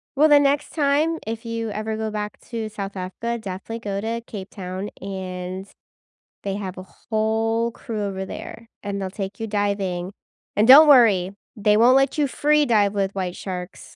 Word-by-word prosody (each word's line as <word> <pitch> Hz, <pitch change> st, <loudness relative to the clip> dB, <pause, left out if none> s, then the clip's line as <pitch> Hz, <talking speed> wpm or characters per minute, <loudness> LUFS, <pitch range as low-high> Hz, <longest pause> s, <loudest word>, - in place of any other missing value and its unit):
Well, 305 Hz, +3 st, +5 dB
the 290 Hz, -1 st, +8 dB
next 285 Hz, 0 st, +1 dB
time, 305 Hz, +2 st, +1 dB
if 225 Hz, +1 st, -5 dB
you 230 Hz, -1 st, -3 dB
ever 215 Hz, +1 st, -3 dB
go 220 Hz, 0 st, -2 dB
back 210 Hz, -1 st, -5 dB
to 225 Hz, -2 st, -3 dB
South 200 Hz, -2 st, -6 dB
Africa, 215 Hz, +6 st, -4 dB
definitely 200 Hz, +3 st, -6 dB
go 200 Hz, -3 st, -3 dB
to 230 Hz, +2 st, -3 dB
Cape 195 Hz, -4 st, -8 dB
Town, 190 Hz, +1 st, -6 dB
and 185 Hz, 0 st, -5 dB, 0.8 s
they 195 Hz, -1 st, -2 dB
have 190 Hz, -2 st, -5 dB
a 185 Hz, -, -7 dB, 0.3 s
whole 225 Hz, +1 st, +1 dB
crew 220 Hz, -2 st, -5 dB
over 190 Hz, -1 st, -3 dB
there, 230 Hz, +4 st, -8 dB, 0.2 s
and 200 Hz, -1 st, -3 dB
they'll 190 Hz, -, -3 dB
take 195 Hz, 0 st, -6 dB
you 225 Hz, -, -3 dB
diving, 200 Hz, -3 st, -1 dB, 0.4 s
and 215 Hz, +3 st, +3 dB
don't 295 Hz, +4 st, +10 dB
worry, 215 Hz, -10 st, +6 dB, 0.2 s
they 210 Hz, 0 st, +3 dB
won't 245 Hz, +3 st, +6 dB
let 270 Hz, +2 st, +3 dB
you 290 Hz, -, +3 dB
free 300 Hz, +2 st, +2 dB
dive 210 Hz, -3 st, +3 dB
with 195 Hz, -1 st, -1 dB
white 185 Hz, -2 st, -3 dB
sharks, 180 Hz, -1 st, -7 dB
210 Hz, 180 wpm, -23 LUFS, 195-230 Hz, 0.8 s, don't